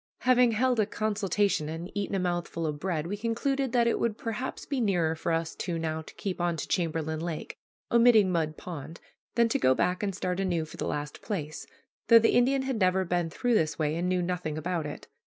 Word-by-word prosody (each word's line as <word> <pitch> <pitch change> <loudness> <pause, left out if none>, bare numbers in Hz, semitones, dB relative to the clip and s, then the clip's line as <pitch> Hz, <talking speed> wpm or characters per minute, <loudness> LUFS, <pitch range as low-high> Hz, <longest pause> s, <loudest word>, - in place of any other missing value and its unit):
Having 250 -2 +4
held 250 +1 +2
a 210 - +3
consultation 205 -6 0
and 165 +3 -6
eaten 200 -1 -2
a - - +1
mouthful 175 -2 -2
of 150 -2 -3
bread, 165 -3 -2
we 195 +4 -3
concluded 245 +5 -1
that 240 -1 +3
it 235 - +1
would 230 -2 0
perhaps 230 +3 -4
be 275 -3 -1
nearer 175 -7 +2
for 165 +1 -3
us 165 0 -1
two 175 -3 -3
now 160 -1 -2
to 160 - -13
keep 185 -3 -4
on 175 -1 0
to - - -4
Chamberlain 160 -3 -1
Lake, 165 -1 -5 0.4
omitting 230 -5 +6
Mud 155 -3 -1
Pond, 160 -2 -8 0.4
than 235 0 +4
to - - +1
go 130 0 +4
back 180 +5 0
and 200 -3 -2
start 180 -1 -2
anew 175 -4 0
for 155 - -12
the - - -3
last 150 0 -4
place, 155 -8 -4 0.4
though 230 - +9
the 225 0 +4
Indian 265 +2 +3
had 265 -4 -2
never 185 0 +3
been 175 -1 0
through 245 +8 0
this 160 -8 +2
way 155 -1 0
and 175 +2 -1
knew 180 -1 +1
nothing 175 -4 -2
about 165 -1 -2
it. 145 - -8
180 Hz, 220 wpm, -28 LUFS, 160-220 Hz, 0.4 s, though